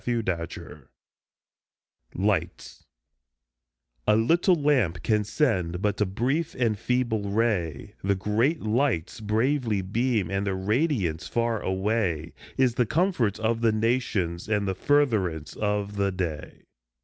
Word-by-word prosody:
Il6 120 -2 -1
LIGHTS 85 -4 -5 1.3
LIGHTS - - -2 1.2
A 105 - +5
LITTLE 170 - +3
lamp 135 - +1
can 105 -2 +2
send 95 - 0
but 105 +1 -1
a 105 - +3
brief 135 - -1
and 115 -5 0
feeble 115 -5 0
ray, 100 - -1
The 100 +1 +2
great 110 - 0
lights 115 - 0
bravely 110 0 0
beam, 110 -1 0
and 100 +1 -1
their 95 - 0
radiance 100 - 0
far 115 -2 0
away 95 -4 -1 0.2
Is 130 -3 +3
the 120 -1 +1
comfort 155 - +1
of 115 +1 0
the 115 -1 +4
nations 110 -6 -1
and 105 -2 +1
the 95 - 0
furtherance 95 - +1
of 105 -1 -2
the 100 -1 +1
day. 85 -6 -5
105 Hz, 125 wpm, -26 LUFS, 95-120 Hz, 1.3 s, A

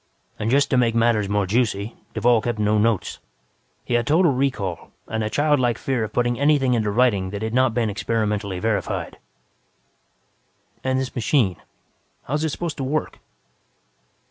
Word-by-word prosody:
"And, 110 - -1
just 140 +3 +2
to 130 - +3
make 115 -2 +2
matters 115 -3 +2
more 105 -1 +1
juicy, 110 0 -1 0.2
Duvall 120 -2 +3
kept 120 0 -2
no 105 0 +2
notes. 110 -2 0 0.7
He - - -3
had 120 -1 +1
total 165 +2 +4
recall 125 - -2 0.2
and 110 0 -2
a 105 - -1
childlike 145 -4 +2
fear 130 -4 -1
of 110 - -4
putting 120 +1 0
anything 140 -3 +3
into 110 -3 +1
writing 100 -4 +2
that 100 +2 -5
had 110 0 -3
not 130 -2 +2
been 120 -2 +1
experimentally 105 -2 -2
verified." 105 +2 -2 1.6
"And 130 0 0
this 130 -1 -4
machine, 115 - +1 0.7
how 135 - -6
is 150 +1 0
it 160 - +1
supposed 165 +1 -4
to 135 - -3
work?" 150 +4 -2
115 Hz, 165 wpm, -22 LUFS, 105-130 Hz, 1.6 s, total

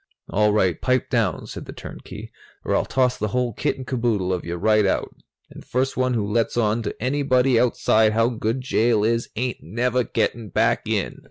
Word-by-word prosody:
"All 105 +1 +2
right, 95 -5 +1
pipe 130 0 0
down," 110 -9 0
said - - -8
the - - -9
turnkey, - - -9 0.3
"or - - +1
I'll - - +1
toss 125 -1 +1
the 105 - 0
whole 125 +2 -1
kit 145 - -1
and 130 - -7
caboodle 115 -7 0
of 90 - -3
you 85 +1 -4
right 105 +4 +3
out. - - -1 0.4
And - - -11
first 130 +2 -1
one 130 -1 +1
who 105 -3 0
lets 115 +3 0
on 110 0 +1
to 110 - -4
anybody 130 -1 +2
outside 110 -3 +3
how 115 +1 +3
good 115 +1 -2
jail 115 -3 +2
is 115 +1 0
ain't 125 +2 -3
never 120 +8 0
getting 115 -2 -2
back 115 +1 +1
in!" 110 -3 -2
115 Hz, 195 wpm, -23 LUFS, 105-125 Hz, 0.4 s, right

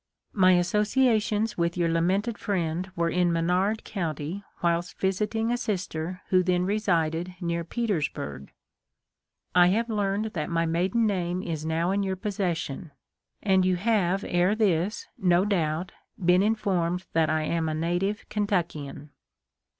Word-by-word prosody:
My 185 -2 +5
associations 210 +3 +2
with 170 +1 0
your 170 -1 +2
lamented 190 +7 0
friend 180 -3 -2
were 170 0 0
in 180 -1 +2
Menard 180 +6 +1
county 170 0 -4 0.2
whilst 170 +1 0
visiting 210 +4 0
a 245 - +1
sister 185 -5 -3
who 185 -1 +4
then 180 0 +1
resided 180 -4 0
near 170 -2 -2
Petersburg. 155 - -3 1.0
I 180 -1 +6
have 225 +5 +1
learned 205 +1 -1
that 155 -3 -3
my 165 0 +1
maiden 180 +8 +1
name 180 -3 -1
is 160 -2 -4
now 165 +3 0
in 200 +1 +1
your 190 -1 -1
pos 200 +2 -5
session; 170 -4 -2 0.5
and 190 -2 +4
you 185 0 +2
have 195 -1 +1
ere 180 +4 +2
this, 200 -2 0
no 180 0 +3
doubt, 175 -3 -1 0.3
been 180 0 +4
in 215 +2 +3
formed 180 -4 -1
that 160 -1 +3
I 155 0 +1
am 160 0 -1
a 155 - -2
native 175 +6 -1
Kentuckian." 165 -8 -2
180 Hz, 145 wpm, -26 LUFS, 170-205 Hz, 1.0 s, I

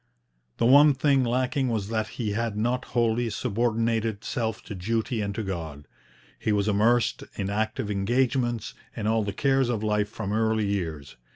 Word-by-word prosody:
The - - +1
one 145 +3 +7
thing 135 -1 +3
lacking 130 +2 0
was 110 -3 -2
that 110 -1 -1
he 110 -4 -1
had 110 0 -2
not 120 +4 0
wholly 120 0 +1
subordinated 115 -1 -1
self 110 -2 -3
to - - -7
duty 110 +4 -1
and 100 -1 -3
to 110 - -2
God. 80 -7 -6 0.5
He 110 - 0
was 100 0 +1
immersed 110 +3 +2
in 100 -1 -3
active 110 0 -1
engagements 120 +2 0 0.2
and 105 -3 -3
all 110 0 +2
the 100 - -2
cares 135 +4 +1
of 110 -3 -1
life 105 -1 +1
from 105 -2 -4
early 110 -1 +1
years. 80 -8 -3
110 Hz, 170 wpm, -26 LUFS, 105-120 Hz, 0.5 s, one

